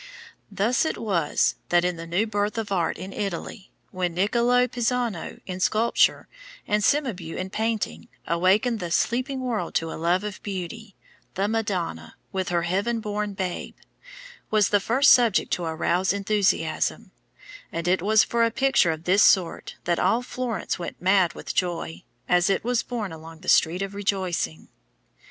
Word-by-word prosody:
Thus 205 Hz, +5 st, +1 dB
it 320 Hz, -, -2 dB
was 185 Hz, -9 st, +1 dB
that 175 Hz, 0 st, +3 dB
in 180 Hz, -1 st, 0 dB
the 165 Hz, 0 st, -8 dB
new 175 Hz, +6 st, +1 dB
birth 205 Hz, 0 st, -1 dB
of 215 Hz, -3 st, -3 dB
art 175 Hz, -4 st, 0 dB
in 190 Hz, +3 st, -7 dB
Italy, 195 Hz, 0 st, -5 dB, 0.2 s
when 180 Hz, -2 st, -2 dB
Niccolò 235 Hz, +6 st, +3 dB
Pisano 240 Hz, -6 st, -2 dB
in 185 Hz, -1 st, -5 dB
sculpture, 220 Hz, +5 st, +2 dB, 0.4 s
and 210 Hz, 0 st, +1 dB
Cimabue 205 Hz, -, 0 dB
in 185 Hz, +1 st, -4 dB
painting, 220 Hz, 0 st, -2 dB, 0.2 s
awakened 195 Hz, +7 st, +2 dB
the 175 Hz, -, -4 dB
sleeping 255 Hz, -, 0 dB
world 230 Hz, -9 st, -3 dB
to 165 Hz, 0 st, 0 dB
a -, -, -7 dB
love 175 Hz, +3 st, +2 dB
of 210 Hz, -2 st, -6 dB
beauty, 200 Hz, +2 st, -6 dB, 0.4 s
the 195 Hz, +2 st, 0 dB
Madonna, 185 Hz, -, -3 dB, 0.2 s
with 190 Hz, -1 st, -2 dB
her 170 Hz, -1 st, +1 dB
heaven 200 Hz, +7 st, 0 dB
born 210 Hz, -2 st, -3 dB
Babe, 185 Hz, -2 st, -4 dB, 0.7 s
was 210 Hz, -2 st, +3 dB
the 205 Hz, -, +3 dB
first 255 Hz, +8 st, +4 dB
subject 235 Hz, -5 st, +4 dB
to 175 Hz, -, -1 dB
arouse 170 Hz, +4 st, 0 dB
enthusiasm; 195 Hz, -6 st, 0 dB, 0.6 s
and 170 Hz, +1 st, -3 dB
it 180 Hz, -1 st, +2 dB
was 215 Hz, +3 st, +4 dB
for 235 Hz, 0 st, +1 dB
a 230 Hz, -, +3 dB
picture 240 Hz, -5 st, +2 dB
of 160 Hz, 0 st, -3 dB
this 190 Hz, +4 st, +3 dB
sort 185 Hz, -4 st, +3 dB
that 175 Hz, -1 st, 0 dB
all 225 Hz, +7 st, +2 dB
Florence 245 Hz, -6 st, -3 dB
went 175 Hz, -, -6 dB
mad 185 Hz, -2 st, +3 dB
with -, -, -6 dB
joy, 170 Hz, -2 st, -2 dB, 0.3 s
as 180 Hz, +1 st, +3 dB
it 195 Hz, -, +1 dB
was 245 Hz, 0 st, +1 dB
borne 225 Hz, -7 st, -4 dB
along 160 Hz, 0 st, -11 dB
The 185 Hz, -, -4 dB
Street 175 Hz, +4 st, +3 dB
of 195 Hz, 0 st, -5 dB
Rejoicing. 185 Hz, -, -2 dB
195 Hz, 165 wpm, -25 LUFS, 175-225 Hz, 0.7 s, first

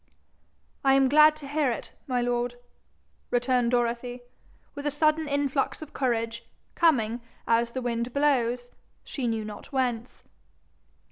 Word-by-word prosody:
'I 270 Hz, -1 st, +5 dB
am 270 Hz, -1 st, +4 dB
glad 305 Hz, +2 st, +7 dB
to 300 Hz, -2 st, -9 dB
hear 290 Hz, -2 st, +1 dB
it, 230 Hz, -, -5 dB, 0.2 s
my 250 Hz, -2 st, 0 dB
lord,' 245 Hz, 0 st, -1 dB, 0.7 s
returned 245 Hz, 0 st, +2 dB
Dorothy, 245 Hz, 0 st, -1 dB, 0.5 s
with 285 Hz, +1 st, -4 dB
a -, -, +3 dB
sudden 310 Hz, +1 st, +2 dB
influx 280 Hz, -1 st, 0 dB
of 305 Hz, -, -13 dB
courage, 230 Hz, -3 st, -1 dB, 0.3 s
coming, 240 Hz, -8 st, +2 dB, 0.3 s
as 230 Hz, 0 st, +3 dB
the 255 Hz, +1 st, -5 dB
wind 235 Hz, 0 st, -2 dB
blows, 245 Hz, -4 st, +1 dB, 0.3 s
she 260 Hz, -4 st, -3 dB
knew 225 Hz, -2 st, -1 dB
not 210 Hz, +5 st, -9 dB
whence. 250 Hz, -3 st, -2 dB
250 Hz, 135 wpm, -27 LUFS, 235-285 Hz, 0.7 s, glad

